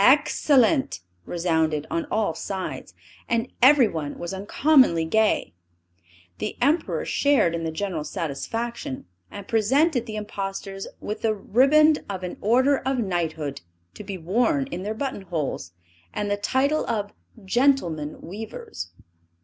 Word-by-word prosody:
Excellent!" 275 - +4 0.3
resounded 160 -3 0
on 165 - -1
all 215 -6 0
sides; 190 +3 -5 0.3
and 235 +1 0
everyone 230 - +4
was 175 +2 -5
uncommonly 205 - +3
gay. 215 - +1 0.9
The - - -4
Emperor 290 +7 +1
shared 275 -12 +2
in 165 -1 -3
the 160 - -2
general 170 -2 -3
satisfaction; 165 - -4 0.2
and 200 -1 -9
presented 245 +4 +2
the 215 - -5
impostors 195 -1 -5
with 210 +1 -5
the 220 -1 +1
riband 290 +9 +4
of 190 -2 -4
an 180 - -5
order 260 +6 +3
of 265 0 -1
knighthood, 160 - -2 0.3
to - - -9
be 195 -1 -5
worn 245 - +1
in 180 - -4
their 210 +3 -3
button 260 -3 -3
holes, 155 - -4 0.4
and 205 0 -1
the - - +3
title 270 +8 +1
of 205 -3 -2 0.3
"Gentlemen 190 - +1
Weavers." 185 - -7
205 Hz, 130 wpm, -24 LUFS, 170-255 Hz, 0.9 s, Excellent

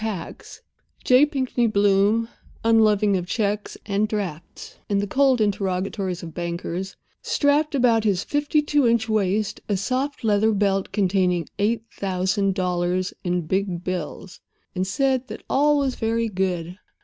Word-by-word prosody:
tax, 205 -6 -6 0.4
J. 255 +4 +5
Pinkney 260 -5 0
Bloom 205 +2 +3 0.4
(unloving 215 -3 +4
of 180 -1 -2
checks 205 0 -2
and 205 +1 0
drafts 195 -7 -6
and 200 -1 +1
the 205 - 0
cold 265 +3 +3
interrogatories 190 -2 -1
of 165 -2 -8
bankers) 175 +2 -4 0.3
strapped 295 +1 +1
about 235 -4 +3
his 200 -4 +1
fifty 295 +1 0
two 290 -3 +2
inch 230 -1 +2
waist 210 -1 0
a 200 - +1
soft 260 +8 -2
leather 215 0 +3
belt 195 -1 0
containing 185 -4 +1
eight 220 +2 +1
thousand 190 +1 -1
dollars 180 0 -1
in 180 0 0
big 185 0 -1
bills, 180 0 -5 0.3
and 185 0 -2
said 265 +4 0
that - - -8
all 295 +2 +3
was 275 -2 0
very 230 0 -1
good. 180 -2 -2
205 Hz, 140 wpm, -23 LUFS, 185-230 Hz, 0.4 s, J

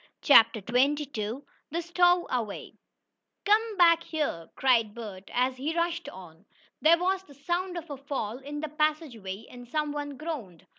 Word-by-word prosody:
CHAPTER 230 -6 +6
XXII 255 -2 0 0.3
THE 340 +3 -2
STOWAWAY 345 - +1 0.7
"Come 430 +1 +2
back 335 -2 +6
here!" 300 - -3
cried 230 -5 +2
Bert, 200 -5 -8
as 255 +1 +1
he 305 +6 -3
rushed 340 0 -1
on. 175 -2 -13 0.4
There 325 +2 +6
was 375 +2 0
the 285 -7 -17
sound 350 +5 -2
of 340 -1 -6
a 285 - -5
fall 260 -5 -4
in 290 +2 -6
the 310 - -4
passageway, 285 - -2
and 245 -1 -12
some 300 +3 -1
one 290 -1 -5
groaned. 255 - -6
285 Hz, 150 wpm, -28 LUFS, 235-335 Hz, 0.7 s, CHAPTER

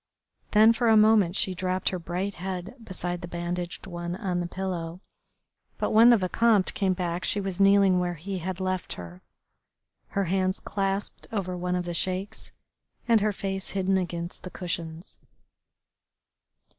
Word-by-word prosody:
Then 220 +2 +7
for 235 +1 0
a 220 -1 +6
moment 210 -4 +5
she 190 - +2
dropped 185 +1 0
her 185 - -3
bright 180 +4 -3
head 185 +2 -5
beside 175 -3 -4
the 175 - -6
bandaged 175 +1 -4
one 175 -1 -5
on 180 -2 -2
the 175 - -2
pillow, 175 -2 -4 0.8
but - - -1
when 225 +2 +7
the 240 - +7
Vicomte 205 +1 +2
came 190 -2 +1
back 175 -1 -3
she 205 - +2
was 195 -1 -2
kneeling 195 -2 +5
where 175 -1 -1
he 190 +4 -5
had 185 +2 -4
left 185 -1 -2
her, 90 +1 -10 0.9
her 200 - -1
hands 185 +1 0
clasped 195 0 -3
over 190 -4 -2
one 180 0 -2
of 180 0 -2
the 175 - -3
Sheik's 185 +3 -2 0.6
and 230 -3 +4
her 210 +1 +2
face 195 -1 -2
hidden 190 0 +1
against 170 -1 -4
the 185 - -7
cushions. 170 -1 -5
185 Hz, 160 wpm, -27 LUFS, 175-195 Hz, 0.9 s, Then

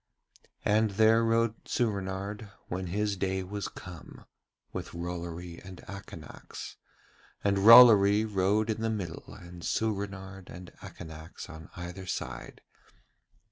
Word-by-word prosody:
And 110 +1 +3
there 110 +1 +5
rode 115 0 +2
Soorenard, 100 -1 -2 0.2
when 90 +1 -3
his 105 +3 -1
day 95 0 -1
was 100 +2 -4
come, 90 -3 -11 0.5
with - - -6
Rollory 85 0 -5
and 95 0 -10
Akanax, 100 0 -9 0.7
and 100 -1 +2
Rollory 110 -2 +9
rode 105 +2 +1
in 110 - -4
the 115 - 0
middle 95 -7 -5
and 85 0 -11
Soorenard 100 -3 -3
and 90 +1 -10
Akanax 80 -1 -9
on 80 0 -11
either 90 +2 -7
side. 65 -8 -5
95 Hz, 115 wpm, -29 LUFS, 90-105 Hz, 0.7 s, Rollory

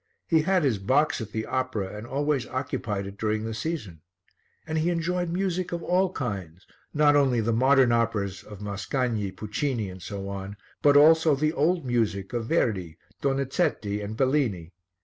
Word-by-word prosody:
He 160 -2 +3
had 185 +1 +2
his 125 -8 +1
box 140 +8 +2
at 110 - -5
the 110 0 -3
opera 115 -7 -2
and 105 +3 -7
always 140 0 0
occupied 115 -6 -3
it 100 0 -9
during 110 0 0
the 115 - -3
season. 110 - -4 0.6
And 160 0 -1
he 165 +3 +1
enjoyed 175 +1 -1
music 185 0 -1
of 170 -1 -3
all 185 +1 +2
kinds, 95 - -5 0.3
not 150 -1 +4
only 135 -4 +3
the 115 +1 +1
modern 130 +1 +4
operas 105 -5 0
of 105 -1 -11
Mascagni, 105 +1 -2
Puccini 110 +1 -3
and 95 0 -11
so 100 0 -6
on, 100 +1 -6 0.2
but 145 -1 +6
also 160 0 +6
the 155 +3 0
old 165 +1 +1
music 110 -5 -1
of 115 -2 -2
Verdi, 95 - 0 0.2
Donizetti 135 -6 0
and 110 +2 -6
Bellini. 130 - 0
125 Hz, 170 wpm, -26 LUFS, 100-150 Hz, 0.6 s, but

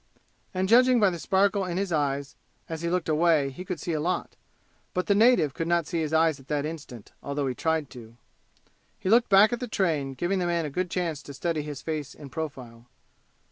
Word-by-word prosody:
And 185 0 -1
judging 250 +3 +5
by 205 -3 +4
the 170 - -5
sparkle 195 +3 +2
in 180 -1 -3
his 195 -1 -1
eyes 140 -2 -1 0.3
as 160 -1 -5
he 170 - -1
looked 180 0 -1
away 155 -3 +3
he 155 +7 -8
could 180 -3 -5
see 170 - -3
a 155 - 0
lot. 175 +4 -2 0.6
But 180 -1 0
the 200 - +3
native 200 - +4
could 165 - -3
not 170 -1 +2
see 165 +2 -2
his 155 -2 -2
eyes 160 -2 +3
at 135 - -17
that 150 -1 -1
instant, 150 -8 -8
although 140 0 -2
he 130 - -1
tried 160 0 -1
to. 115 -2 -12 0.8
He 185 - -3
looked 235 +1 +5
back 205 +4 +6
at 240 - -2
the 250 - -4
train, 155 - -1
giving 180 +6 -1
the 175 - 0
man 170 -2 0
a 150 - -5
good 180 +4 -2
chance 170 -5 -2
to 140 -1 -10
study 165 +2 -1
his 145 -2 -7
face 155 -4 -4
in 140 -3 -11
profile. 125 -7 -7
165 Hz, 220 wpm, -27 LUFS, 145-185 Hz, 0.8 s, back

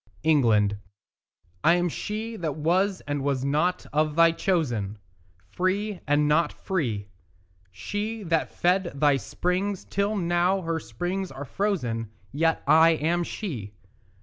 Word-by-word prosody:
ENGLAND 110 -9 +3 0.8
I 170 - +6
am 175 0 +1
she 215 +6 -4
that 160 -8 -3
was 185 +5 +1
and 145 -1 -3
was 135 -2 0
not 155 +6 +1
of 155 0 +1
thy 165 0 +6
chosen, 120 - -1 0.5
Free, 195 - -1
and 145 +1 +3
not 150 +1 +3
free; 115 - -3 0.6
She 205 - -4
that 165 -3 0
fed 180 0 +1
thy 145 -1 +3
springs, 180 - -2
till 200 +2 -1
now 175 +1 +1
her 165 -1 -2
springs 175 - -4
are 145 - -7
frozen; 125 - -2 0.2
Yet 160 +3 +1
I 160 +1 +6
am 165 +3 0
she. 120 - -5
165 Hz, 130 wpm, -26 LUFS, 140-185 Hz, 0.8 s, I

